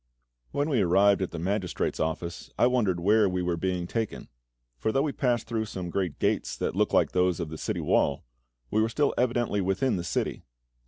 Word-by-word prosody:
When 145 +1 -1
we 135 -8 +2
arrived 100 +2 +4
at 95 - -1
the 85 - -7
magistrate's 95 +2 -2
office, 85 +2 -3
I - - +4
wondered 115 -8 +2
where 105 +3 +4
we 90 0 -1
were 90 -1 0
being 90 0 -2
taken; 110 +4 -4 0.5
for 110 - 0
though 135 +4 +2
we 150 - 0
passed 120 -4 0
through 115 -1 -2
some 90 -4 -6
great 90 -6 -2
gates - - 0
that - - -2
looked - - +1
like - - +3
those 90 -1 +2
of 85 -3 -3
the 80 - -7
city - - -2
wall, 70 - +1 0.5
we 110 - +3
were 110 - +1
still 145 +5 +1
evidently 120 -4 +1
within 95 +5 +1
the 85 - -3
city. 85 - -2
100 Hz, 205 wpm, -27 LUFS, 90-115 Hz, 0.5 s, arrived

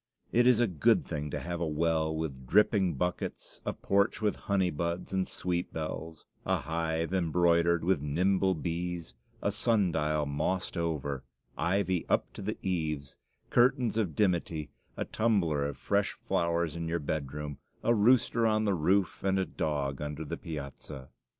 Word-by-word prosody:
It 120 +1 +4
is 125 -3 +6
a 120 - +5
good 85 -9 +3
thing 75 0 -4
to - - -3
have 85 0 -4
a 85 - +1
well 80 0 +1
with 70 -5 -4
dripping 95 - +3
buckets, 90 +6 -3
a - - +2
porch 100 +2 +1
with 105 -2 +1
honey 95 -3 0
buds 85 +5 -3
and 95 -1 +1
sweet 90 -1 -2
bells, 80 0 -5 0.2
a - - +1
hive 80 +1 -1
embroidered 85 -1 +3
with 90 -4 +2
nimble 95 +6 +2
bees, 85 -1 -3 0.3
a - - +2
sun 105 -6 +2
dial 75 -1 0
mossed 90 +8 -1
over, 75 -5 -2 0.3
ivy 95 0 +1
up - - +1
to - - -8
the 105 +3 -3
eaves, 75 -6 -2 0.3
curtains 125 -2 +3
of 100 -9 0
dimity, 85 -6 0 0.3
a - - -1
tumbler 95 -10 +1
of 70 - -6
fresh 100 -1 0
flowers 85 -2 0
in 85 -1 -3
your 85 +1 0
bedroom, 75 -1 -4 0.2
a 120 - +4
rooster 115 +1 +4
on 110 0 +2
the 100 - +2
roof, 95 +3 +1
and 95 0 +2
a 95 - +1
dog 70 -5 -2
under 75 +1 -4
the - - -3
piazza. 70 -3 -7
85 Hz, 165 wpm, -30 LUFS, 75-95 Hz, 0.3 s, is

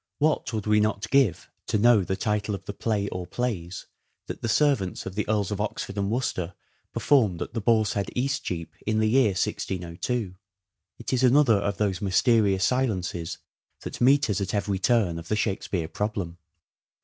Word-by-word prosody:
What 155 -3 +1
would 110 -3 -3
we 105 0 +4
not 105 -1 0
give 130 -11 +3 0.2
to - - +1
know 115 -1 +5
the 95 - -2
title 105 +1 -1
of 95 - -10
the 100 - -5
play 105 -2 -1
or 90 -1 -5
plays 95 -6 -3 0.4
that - - -7
the 115 - -2
servants 130 -8 +1
of 95 - -5
the 105 +1 -3
Earls 105 -2 0
of 105 0 -2
Oxford 105 -1 -4
and 100 -1 -1
Worcester 95 -7 -2 0.4
performed 110 -12 +2
at - - -5
the 115 - -2
Boar's 110 -2 +2
Head, 100 -1 -2
Eastcheap, 90 - -2
in 110 0 +1
the 110 0 +2
year 125 -5 +4
1602? 90 +4 -3 0.6
It - - -5
is 130 - +2
another 130 -3 +5
of 100 0 -2
those 100 -4 -1
mysterious 100 -1 +3
silences 95 -10 -1 0.4
that - - -7
meet 135 +2 +5
us 105 -2 -1
at 95 +1 -2
every 100 -1 -1
turn 100 -8 +2
of 85 - -10
the 110 - 0
Shakespeare 95 -5 -2
problem. 95 -3 -4
105 Hz, 180 wpm, -26 LUFS, 95-115 Hz, 0.6 s, know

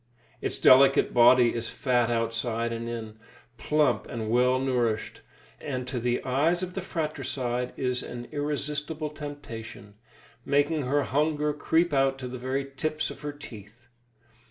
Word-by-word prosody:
Its - - -2
delicate 135 +1 +6
body 120 0 +6
is 115 0 -4
fat 120 -3 +1
outside 115 0 -1
and 115 0 -4
in, 110 -2 -6 0.4
plump 150 -1 +1
and 110 -2 -4
well 125 +2 +4
nourished, 125 -5 -1 0.4
and 130 -4 -4
to 125 -1 -3
the 120 +1 -1
eyes 155 +8 +1
of 180 0 -5
the 195 - -3
fratricide 130 -7 -3
is 125 -1 -1
an 120 0 -7
irresistible 150 +1 -3
temptation, 140 -8 -8 0.5
making 145 +2 +1
her 145 +2 +2
hunger 150 +1 0
creep 160 +2 +1
out 135 -1 +2
to 130 -1 -6
the 125 0 -7
very 130 +2 -2
tips 155 +3 -2
of - - -11
her 150 0 -4
teeth. 120 -5 -13
130 Hz, 145 wpm, -27 LUFS, 120-150 Hz, 0.5 s, delicate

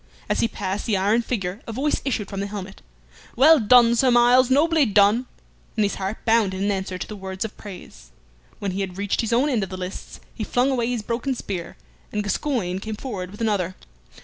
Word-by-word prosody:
As - - 0
he - - +3
passed 200 -1 -4
the 210 -4 +2
iron 205 +5 +2
figure 200 -4 -3
a - - -4
voice 275 +6 -1
issued 220 -7 -2
from 195 -1 -5
the 200 - -2
helmet, 200 -2 -7 0.5
"Well 300 +5 +7
done, 235 +1 +6
Sir 255 +2 +3
Myles, 245 +1 +5
nobly 310 +3 +4
done!" 210 +2 +3 0.5
and 215 - +3
his 200 - -1
heart 195 +3 -4
bounded 220 -5 +2
in 200 +1 +1
answer 190 -1 -3
to - - -5
the 215 - -7
words 190 0 -5
of 220 - -7
praise. 120 - -11 0.5
When 200 -2 -3
he 195 +2 -3
had 185 -1 -4
reached 200 0 0
his 225 -1 -3
own 245 +5 +3
end 250 -7 +1
of 195 - -3
the 185 - -6
lists, 185 +1 -7
he 220 - -5
flung 250 +5 +1
away 240 -3 0
his 240 -3 -2
broken 240 +4 -2
spear, 185 -7 -6 0.3
and 210 0 -1
Gascoyne 205 -4 -1
came 215 +2 -5
forward 205 -6 -5
with 205 +4 -11
another. 195 -5 0
210 Hz, 215 wpm, -23 LUFS, 195-240 Hz, 0.5 s, Well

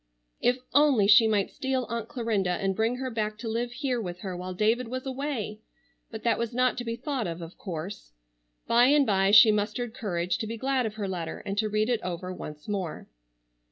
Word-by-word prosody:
If 245 +1 +2 0.2
only 285 -7 +5
she 210 +2 +7
might 205 -3 +1
steal 265 -1 -1
Aunt 230 0 -4
Clarinda 225 -7 -1
and 195 +2 0
bring 225 +3 +1
her 260 0 -4
back 215 -1 -2
to 230 - -6
live 235 +2 -2
here 250 -1 -2
with 180 -3 -6
her 190 -2 -4
while 180 +1 -6
David 225 +5 +1
was 255 +3 -5
away! 260 -6 -3 0.5
But 220 -1 -8
that 230 -1 +2
was 235 0 -3
not 255 0 +2
to - - -3
be 230 -1 -3
thought 265 - -3
of, 165 0 -5
of 165 +1 -9
course. 180 - -6 0.5
By 240 +1 +5
and 290 0 +5
by 195 -3 +3
she 210 +2 +9
mustered 215 +3 -1
courage 180 -7 -2
to 220 - -3
be 230 +1 -5
glad 260 0 0
of 215 - -7
her 205 -2 -3
letter, 170 -4 -5
and 195 -1 -3
to 215 -1 +1
read 215 +1 +1
it 240 -2 0
over 180 +1 -4
once 150 -4 -9
more. 190 -6 -4
220 Hz, 215 wpm, -27 LUFS, 195-245 Hz, 0.5 s, she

